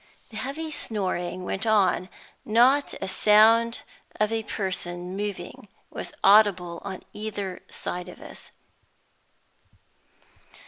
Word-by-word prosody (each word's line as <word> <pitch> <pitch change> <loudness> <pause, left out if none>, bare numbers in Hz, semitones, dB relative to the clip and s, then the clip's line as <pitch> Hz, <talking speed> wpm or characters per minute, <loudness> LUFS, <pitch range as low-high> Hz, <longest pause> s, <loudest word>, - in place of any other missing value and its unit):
The 220 - -8
heavy 280 +7 -4
snoring 185 -8 -3
went 195 +4 -3
on; 195 -3 +3 0.3
not 250 +6 +3
a - - -2
sound 225 +4 +4 0.4
of 215 +1 +2
a 225 0 0
person 180 -3 -4
moving 205 0 -5 0.2
was - - -6
audible 190 -4 +4
on 190 -2 -6
either 205 -3 -5
side 180 0 -5
of - - -12
us. - - -11
205 Hz, 105 wpm, -26 LUFS, 185-220 Hz, 0.4 s, sound